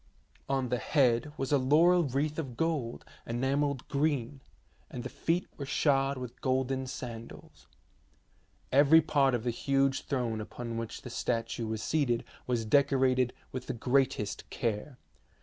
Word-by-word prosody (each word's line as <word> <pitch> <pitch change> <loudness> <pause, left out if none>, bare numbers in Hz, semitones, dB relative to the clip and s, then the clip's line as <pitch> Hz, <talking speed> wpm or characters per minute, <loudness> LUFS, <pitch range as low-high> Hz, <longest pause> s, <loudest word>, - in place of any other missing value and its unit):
On 135 -2 0
the 125 0 0
head 125 -1 +2
was 135 0 -2
a 145 - +4
laurel 165 +6 +4
wreath 145 +4 -1
of 130 -7 -5
gold 155 -8 -1 0.2
enamelled 135 +3 0
green, 140 -3 -1 0.5
and 120 - -6
the - - -5
feet 170 +2 -1
were 140 - -4
shod 135 0 +2
with 125 -1 -8
golden 130 0 0
sandals. 115 -3 -9 1.0
Every 145 +4 +7
part 140 -4 +2
of 115 - -3
the 120 - 0
huge 135 +2 +1
throne 120 -5 -1
upon 115 +2 -6
which 115 -1 -5
the 125 - -7
statue 115 -1 -2
was 110 -1 -3
seated 130 -7 +1 0.2
was 120 -3 0
decorated 130 0 +3 0.2
with 130 -1 -6
the - - -2
greatest 125 -3 0
care. 120 +2 -3
130 Hz, 145 wpm, -30 LUFS, 120-140 Hz, 1.0 s, Every